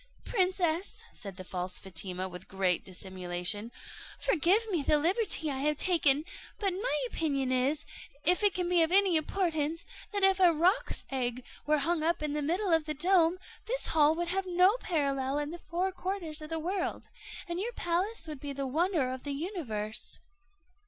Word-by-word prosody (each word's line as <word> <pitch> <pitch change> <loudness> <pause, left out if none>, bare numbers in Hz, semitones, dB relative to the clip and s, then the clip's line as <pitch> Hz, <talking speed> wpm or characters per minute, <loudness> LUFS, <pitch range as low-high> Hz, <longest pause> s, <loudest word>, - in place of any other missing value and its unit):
"Princess," 365 -3 0
said 195 -3 -8
the 185 - -7
false 180 0 -4
Fatima, 185 0 -3
with 180 0 -10
great 190 -2 0
dissimulation, 185 +3 -2 0.5
"forgive 405 +2 +3
me 340 -5 +1
the 300 +2 +3
liberty 340 -1 +3
I 265 - -3
have 300 +1 +1
taken; 305 -4 +4 0.3
but 395 -3 0
my 360 - -1
opinion 275 -2 -1
is, 270 +4 +1 0.4
if 360 +5 +4
it 410 -2 +3
can 360 -1 -1
be 350 -1 +4
of 325 +1 +2
any 385 -2 +4
importance, 320 -1 0 0.3
that 405 -1 -1
if 385 0 +5
a 355 -3 +6
roc's 355 +8 +1
egg 250 -1 -2 0.2
were 305 0 +4
hung 320 +3 0
up 330 0 +1
in 300 -1 -1
the 300 - -1
middle 350 +5 0
of 320 -2 +3
the 305 0 -3
dome, 345 +2 +3 0.3
this - - -1
hall 305 0 +5
would 345 +1 -2
have 385 +1 -1
no 365 +4 +4
parallel 275 - -1
in 295 +1 -2
the 345 - -7
four 360 +3 -2
quarters 365 -4 -4
of 305 - -8
the 325 - -2
world, 355 +4 -3 0.4
and 340 +1 -3
your 465 +5 -3
palace 350 +2 -2
would 300 -3 -6
be 285 0 -5
the 275 0 -3
wonder 310 -1 +1
of 260 0 -5
the 285 +1 -4
universe." 275 - -3
315 Hz, 180 wpm, -30 LUFS, 270-365 Hz, 0.5 s, a